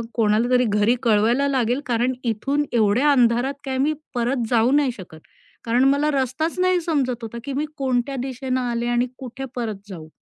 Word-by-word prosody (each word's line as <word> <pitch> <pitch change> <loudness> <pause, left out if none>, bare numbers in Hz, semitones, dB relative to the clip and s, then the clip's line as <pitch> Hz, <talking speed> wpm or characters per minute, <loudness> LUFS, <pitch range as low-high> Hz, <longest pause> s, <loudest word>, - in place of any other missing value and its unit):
कोणाला 225 +1 +2
तरी 250 0 +4
घरी 210 +3 +2
कळवायला 230 +5 +3
लागेल 255 0 0
कारण 245 +2 +1
इथून 275 +6 0
एवढ्या 235 +6 +3
अंधारात 245 +1 +3
काय 260 -1 -2
मी 300 +3 +2 0.2
परत 240 0 0
जाऊ 235 +2 +3
नाही 285 -2 +3
शकत. 175 -5 -11 0.5
कारण 240 +3 +2
मला 300 +2 +1
रस्ताच 275 +7 -1
नाही 365 -1 +2
समजत 280 -7 0
होता, 225 +1 -6
की 280 -1 -5
मी 295 +3 -1
कोणत्या 265 0 -1
दिशेने 260 0 -3
आले 240 -1 -2
आणि 240 +1 +1
कुठे 265 +1 -7
परत 215 -4 -5
जाऊ? 160 -4 -9
250 Hz, 175 wpm, -22 LUFS, 230-275 Hz, 0.5 s, तरी